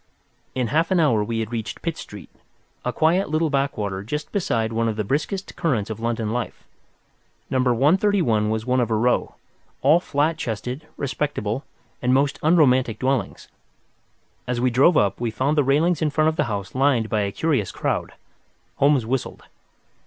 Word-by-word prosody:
In 125 -3 -1
half 165 +2 +2
an 185 - +2
hour 120 -10 +3
we 115 +1 -2
had 110 0 -5
reached 110 -3 -5
Pitt 165 -2 -2
Street, 105 - -10 0.5
a - - -1
quiet 170 +4 +2
little 155 0 +1
backwater 110 -9 -1
just 150 +9 -5
beside 115 - -1
one 115 +1 +1
of 110 - -1
the 105 - -1
briskest 155 - -2
currents 115 -10 -1
of 110 - -6
London 115 -1 -2
life. 120 0 -4 0.9
No. 130 - +1
131 135 - +2
was 110 0 -2
one 130 0 +1
of 120 -2 +1
a 110 - +1
row, 120 +3 +1 0.5
all 150 +5 +6
flat 155 -1 0
chested, 125 +4 -4
respectable, 135 -3 -2 0.4
and 125 +1 +2
most 140 +1 +1
unromantic 130 -8 +3
dwellings. 130 -5 -2 1.0
As 125 -1 -1
we 125 +1 +2
drove 140 +8 +4
up, 100 +2 +1
we 120 - 0
found 130 +7 0
the 145 - +3
railings 150 +5 +2
in 155 - +2
front 155 +1 +2
of 160 - -3
the 150 - +1
house 100 -5 -4
lined 130 -4 +2
by 110 -1 0
a 100 -1 -1
curious 135 - 0
crowd. - - -2 0.6
Holmes 140 -4 +3
whistled. 130 +2 -3
130 Hz, 175 wpm, -23 LUFS, 110-150 Hz, 1.0 s, all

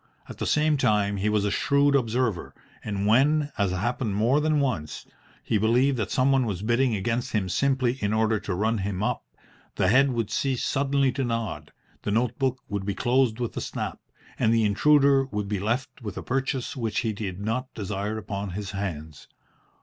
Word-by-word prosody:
At - - -10
the - - -2
same 150 0 +2
time 105 -5 +1
he 100 +2 0
was 105 -1 +1
a 105 - 0
shrewd 140 +6 +2
observer, 120 -6 0 0.3
and 100 -2 -2
when, 145 +7 +3
as 100 -1 +2
happened 105 +3 -1
more 120 +8 +3
than 155 -1 +2
once, 115 - -2 0.4
he 110 - 0
believed 125 +6 +3
that 110 - -2
someone 130 -1 +2
was 100 -2 -3
bidding 120 +1 +2
against 115 +5 -2
him 105 -4 0
simply 130 +5 +1
in 105 0 0
order 110 0 +2
to 95 - -3
run 110 +3 0
him 95 0 -2
up, - - -1 0.5
the 95 - +2
head 135 +5 +5
would 115 -4 -2
cease 135 -3 0
suddenly 140 -1 +1
to 135 +2 -2
nod, 115 -3 -3 0.3
the - - -4
note 115 +3 0
book 130 -2 -1
would 100 -1 -3
be 100 0 -2
closed 125 -2 +1
with 120 -2 -3
a - - -3
snap, - - -4 0.4
and 110 - +3
the 115 -1 +3
intruder 140 +5 +4
would 105 -6 -4
be 100 -1 -2
left 115 +8 -2
with 105 -4 -6
a - - -5
purchase 135 0 -2
which 115 -5 -1
he 110 -2 -1
did 100 -3 -5
not 115 +5 -2
desire 105 +1 -3
upon 100 -1 -4
his 100 -2 -5
hands. 80 -7 -6
115 Hz, 195 wpm, -26 LUFS, 100-130 Hz, 0.5 s, head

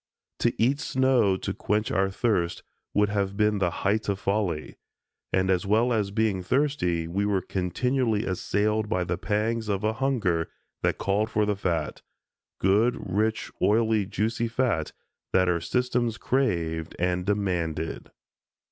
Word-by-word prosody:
To - - +2
eat 130 +5 +3
snow 130 -9 +2
to - - -3
quench 105 +1 -1
our 95 0 +2
thirsts 95 -4 0 0.3
would 105 0 +3
have 100 -1 -1
been 105 -1 +2
the 90 -2 +2 0.2
height 105 +2 +1
of 100 - 0
folly, 95 -7 -2 0.5
and 95 0 +2
as 95 +2 0
well 115 +4 +3
as 105 -3 0
being 105 -2 0
thirsty, 90 - 0
we 95 +4 -1
were 100 -2 +1
continually 110 +5 0
assailed 105 +3 0
by 90 -5 +1
the 85 0 -3
pangs 110 +1 -1
of 100 0 -1
a 110 +1 +1
hunger 110 -11 0 0.3
that - - +1
called 105 +3 0
for 105 -2 +1
the 105 0 0
fat, 85 -6 -2 0.6
good, 105 +6 +3 0.2
rich, 110 +2 0
oily, 110 -2 +3
juicy 115 +3 -1
fat 115 -9 0 0.4
that 95 -1 +4
our 85 -2 +1
systems 120 +1 0
craved 85 - -1
and 90 +1 -1
demanded. 90 -6 -1
105 Hz, 145 wpm, -26 LUFS, 90-110 Hz, 0.6 s, that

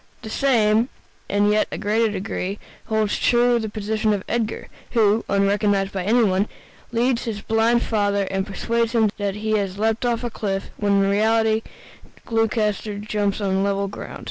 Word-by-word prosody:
The 220 - -7
same, 230 -3 +2 0.4
in 205 +1 +2
a - - +3
yet 215 0 0
greater 220 +2 +1
degree, 195 0 -3 0.3
holds 220 -1 0
true 240 0 +3
of - - -2
the 220 - -3
position 215 +1 -1
of 200 -2 -2
Edgar, 225 -2 -2 0.3
who, 220 -1 +3
unrecognized 200 0 +2
by 190 -2 -3
any 235 +4 +4
one, 195 0 +2 0.4
leads 240 +1 +1
his 215 -3 -4
blind 225 +2 +2
father 205 -2 +1
and 195 +1 -1
persuades 230 +3 -1
him 220 -3 +3
that 200 -1 -1
he 215 +1 -3
has 195 -1 -3
leapt 220 +2 0
off 240 -1 0
a 240 - -3
cliff, 195 -3 -3
when 205 -1 +1
in 200 - +4
reality 220 +1 +2 0.6
Gloucester 215 -2 0
jumps 205 -1 -1
on 195 -1 +1
level 200 0 0
ground. 195 - -8
215 Hz, 170 wpm, -22 LUFS, 200-225 Hz, 0.6 s, any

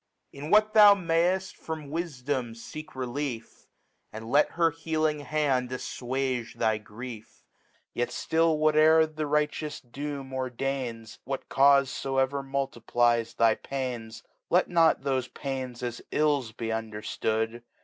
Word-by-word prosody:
Bi - - -11
what 215 +2 +4
thou 210 -2 +9
m^'ft 180 +1 +1
from 155 -3 -7
Wifdom 140 -7 -3
i^^ 155 +7 -9
Relief, 130 -2 -5 0.4
^And 110 +2 -8
let 145 +1 +4
her 165 -1 +3
healine 155 -1 -1
Hand 135 -3 0
aifwage 130 -1 -3
the 110 -1 +1
Grief; 110 +1 -10 0.5
Yet 120 0 -1
ftill 160 +5 +1
whate'er 155 +1 +5
the 155 -1 -4
righteous 150 0 -1
Doom 140 +1 -6
ordains, 130 -3 -4
'Whatv 135 0 -3
Caufe 140 0 +6 0.4
foevcr 140 +1 -4
multiplies 120 -4 0
thy 115 -1 +4
Pains, 120 -5 -5 0.3
Let 180 +2 +3
not 165 -4 +3
thofe 130 -2 -2
Pains 130 -3 -5
as 120 -1 -4
Ills 145 -6 +1
be 115 0 -5
underftood 110 +1 -2
135 Hz, 125 wpm, -28 LUFS, 120-155 Hz, 0.5 s, thou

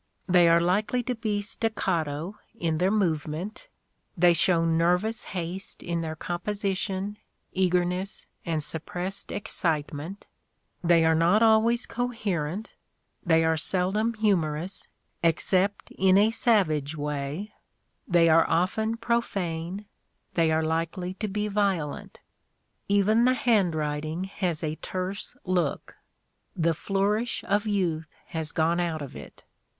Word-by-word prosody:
They 175 -2 +6
are 165 0 +6
likely 205 +8 +1
to 250 - -1
be 215 -3 -2
staccato 190 -5 -2 0.2
in 165 -6 -1
their 185 +2 +3
movement; 180 - -1 0.5
they 175 0 +6
show 165 0 +3
nervous 180 +7 +1
haste 180 +1 -6
in 170 -1 -2
their 160 -1 -4
composition, 195 +3 -3 0.4
eagerness, 180 +1 0 0.2
and 160 -3 -1
suppressed 175 +5 -5
excite 160 -7 -1
ment; 165 +8 -7 0.6
they 165 -1 +5
are 160 - +5
not 175 +7 +4
always 225 +2 +4
coherent; 215 -6 -3 0.5
they 165 -2 +4
are 160 0 +2
seldom 195 +8 0
humorous, 185 -4 0 0.3
except 185 +4 +1
in 190 0 +4
a 210 +2 +5
savage 155 - +2
way; 150 +7 -4 0.5
they 170 -2 +5
are 165 0 +5
often 220 +6 +1
pro 235 +1 +1
fane; 180 -1 -4 0.5
they 165 -2 +3
are 160 0 +2
likely 165 +3 -2
to 215 +3 -4
be 210 +1 -2
violent. 195 -8 -1 0.7
Even 205 +4 +4
the 255 0 +4
handwrit 160 -12 +1
ing 160 +4 -3
has 185 -4 -2
a 155 0 -2
terse 185 +1 -5
look; 180 -5 -1 0.6
the 165 0 +2
flourish 205 +7 -1
of 205 +2 0
youth 170 -7 0 0.2
has 160 -2 -4
gone 165 +2 +1
out 165 -3 -1
of 140 - -9
it. 70 - -11
180 Hz, 125 wpm, -27 LUFS, 160-205 Hz, 0.7 s, They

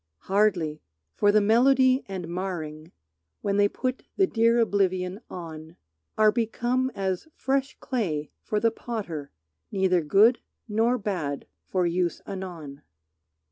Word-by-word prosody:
Hardly. 185 -7 +1 0.3
For 205 - +3
the 210 0 +5
melody 260 +4 +4
and 190 -3 -5
marring, 170 -3 -5 0.5
When 200 0 0
they 205 0 +5
put 255 +4 -3 0.2
the 390 - +5
dear 230 -6 +3
oblivion 190 -3 +1
on, 160 -3 -8 0.4
Are 215 -1 +6
become 240 +3 0
as 190 - -2
fresh 270 0 -1
clay 165 - -2
for 210 - -1
the 230 +1 +3
potter, 195 -12 -5 0.4
Neither 190 -2 +2
good 205 +10 +5 0.3
nor 225 +3 +2
bad, 175 - -3 0.2
for 185 -2 +1
use 175 0 0
anon. 170 -7 -7
195 Hz, 125 wpm, -26 LUFS, 175-230 Hz, 0.5 s, Are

